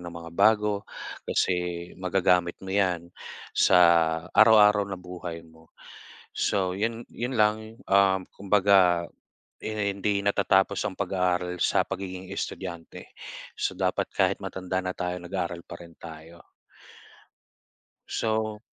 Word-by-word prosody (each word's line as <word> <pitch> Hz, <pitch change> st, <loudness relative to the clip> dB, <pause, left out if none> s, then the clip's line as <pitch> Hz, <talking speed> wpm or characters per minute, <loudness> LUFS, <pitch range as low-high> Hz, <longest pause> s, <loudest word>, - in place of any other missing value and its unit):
ng 85 Hz, -, -10 dB
mga 85 Hz, 0 st, -9 dB
bago 105 Hz, +1 st, +2 dB, 0.4 s
kasi 90 Hz, -1 st, -1 dB
magagamit 90 Hz, -2 st, +1 dB
mo 95 Hz, -, -5 dB
'yan 90 Hz, -4 st, 0 dB, 0.4 s
sa -, -, +4 dB, 0.6 s
araw-araw 105 Hz, -2 st, +6 dB
na 95 Hz, -, -4 dB
buhay 90 Hz, -2 st, -8 dB
mo. 80 Hz, 0 st, -20 dB, 0.7 s
So 95 Hz, -2 st, 0 dB
'yon 115 Hz, +3 st, -3 dB
'yon 125 Hz, 0 st, -4 dB
lang, 110 Hz, +1 st, 0 dB
um, 95 Hz, -1 st, +3 dB
kumbaga 95 Hz, -3 st, +3 dB, 0.5 s
'di 110 Hz, -, -4 dB
na 105 Hz, -, -1 dB
hindi 100 Hz, +1 st, -1 dB
natatapos 100 Hz, -1 st, +2 dB
ang 95 Hz, -, -9 dB
pag-aaral 90 Hz, -2 st, -1 dB
sa -, -, +2 dB
pagiging 95 Hz, -1 st, -6 dB
estudyante. 90 Hz, -3 st, -7 dB, 0.5 s
So 95 Hz, -, -1 dB
dapat 95 Hz, -1 st, -1 dB
kahit -, -, 0 dB
matanda 95 Hz, 0 st, -3 dB
na 90 Hz, 0 st, -5 dB
tayo, 90 Hz, 0 st, -3 dB
nag-aaral 90 Hz, -1 st, -4 dB
pa -, -, -7 dB
rin 85 Hz, -1 st, -12 dB
tayo 80 Hz, +1 st, -12 dB, 1.6 s
So 110 Hz, -1 st, -2 dB
95 Hz, 120 wpm, -26 LUFS, 90-100 Hz, 1.6 s, araw-araw